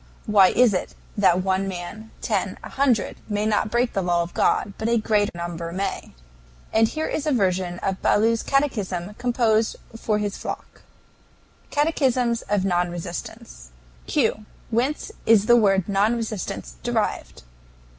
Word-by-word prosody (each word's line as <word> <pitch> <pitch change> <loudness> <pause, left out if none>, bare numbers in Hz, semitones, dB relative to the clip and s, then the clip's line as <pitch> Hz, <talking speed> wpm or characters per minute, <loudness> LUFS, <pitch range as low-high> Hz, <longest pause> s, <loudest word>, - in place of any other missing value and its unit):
Why 200 -3 +6
is 240 +1 +4
it 185 - -3 0.2
that 185 -3 +3
one 190 +1 0
man, 190 +4 -7
ten, - - -1
a - - -7
hundred, 260 -7 +1
may 210 0 0
not 215 0 +1
break 240 +2 +1
the 195 - 0
law 175 -1 +1
of 170 - -9
God, 200 - +1
but 220 - -1
a 235 - +3
great 210 -3 +1
number 170 -1 -5
may?" 190 - -4 0.6
And 225 0 +4
here 315 +6 -3
is 310 - -2
a - - +2
version 185 -6 0
of 190 -1 -2
Ballou's 225 +2 +3
catechism 210 -10 -1
composed 235 -3 +1 0.2
for 220 -1 0
his 205 -1 -3
flock: - - -7 0.9
CATECHISM 260 -6 +1
OF 200 -2 +1
NON 175 -2 +1
RESISTANCE. 165 - -7 0.4
Q. 215 - 0 0.3
Whence 260 - -1 0.2
is 220 -2 +6
the 240 +1 +6
word 195 -5 +3
"non 205 +3 +2
resistance" 210 - -5
derived? - - -2
210 Hz, 150 wpm, -23 LUFS, 185-230 Hz, 0.9 s, Why